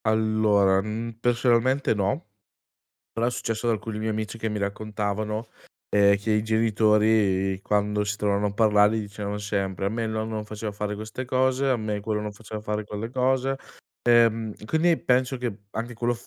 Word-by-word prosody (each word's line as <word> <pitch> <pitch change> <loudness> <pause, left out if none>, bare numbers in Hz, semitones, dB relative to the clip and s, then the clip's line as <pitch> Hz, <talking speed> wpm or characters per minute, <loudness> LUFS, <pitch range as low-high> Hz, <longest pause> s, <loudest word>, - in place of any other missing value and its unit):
Allora, 110 -3 +3
mhmm, 110 +2 -5
personalmente 120 +2 +2
no, 105 - -1 0.8
però 115 +1 0
è - - +1
successo 115 -1 -2
ad - - +4
alcuni 110 0 -5
miei 110 +1 -1
amici 110 +1 -3
che 110 0 -2
mi 105 -1 -3
raccontavano, 105 +2 -3 0.4
ehm, 100 -1 +5
che 105 +2 -1
i 105 0 +2
genitori 105 -3 +2
quando 105 0 +1
si 100 0 -2
trovavano 105 0 +1
a - - -5
parlare, 105 0 +4
gli 110 - -1
dicevano 105 0 -5
sempre: 100 -2 -2
"A - - +3
me 115 +2 -2
il 110 - -2
nonno 110 0 -3
non 105 -1 -3
faceva 105 0 -5
fare 105 0 -3
queste 110 +4 -6
cose, 130 +1 +1
a 130 - +3
me 105 -2 -3
quello 105 +1 -2
non 105 0 -4
faceva 105 +1 -8
fare 105 0 -2
quelle 105 +2 -5
cose". 130 +1 +1 0.5
Ehm, 115 -2 +4
quindi 160 +7 +2
penso 130 +1 +1
che 120 -5 -3
anche 120 +3 -5
quello 120 +1 0
f 115 - -14
110 Hz, 185 wpm, -25 LUFS, 105-115 Hz, 0.8 s, ehm